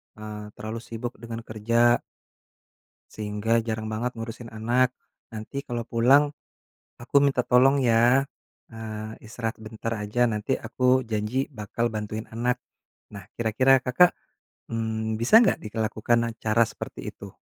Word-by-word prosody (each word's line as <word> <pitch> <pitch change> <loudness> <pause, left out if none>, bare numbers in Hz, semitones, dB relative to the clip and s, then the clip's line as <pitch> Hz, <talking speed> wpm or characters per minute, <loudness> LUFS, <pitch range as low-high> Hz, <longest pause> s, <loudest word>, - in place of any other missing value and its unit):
eee, 105 -1 -7
terlalu 110 +2 -5
sibuk 115 0 -6
dengan 115 0 -6
kerja." 115 +2 +2 1.2
Sehingga 105 +1 -2
jarang 110 -1 -2
banget 120 +3 -1
ngurusin 115 +1 -7
anak. 120 +3 +1 0.4
Nanti 115 +6 -5
kalau 120 -1 -4
pulang, 140 +5 +4 0.7
aku 125 - -1
minta 135 -3 +2
tolong 125 +3 +5
ya. 120 +3 +4 0.5
Nah, 110 -1 -7
istirahat 115 0 -5
sebentar 110 +1 -5
aja, 105 +4 0
nanti 105 +4 -2
aku 130 0 +2
janji 110 +7 -1
bakal 115 +3 -1
bantuin 110 +1 -4
anak. 125 +2 +1 0.6
Nah, 100 -2 -8
kira-kira 125 +4 +4
Kakak, 175 +8 +5 0.6
mmm, 110 -1 -2
bisa 130 - +7
enggak 235 - +3
dilakukan 110 +1 0 0.2
cara 110 +2 +4
seperti - - -7
itu? - - -11
115 Hz, 125 wpm, -26 LUFS, 110-125 Hz, 1.2 s, bisa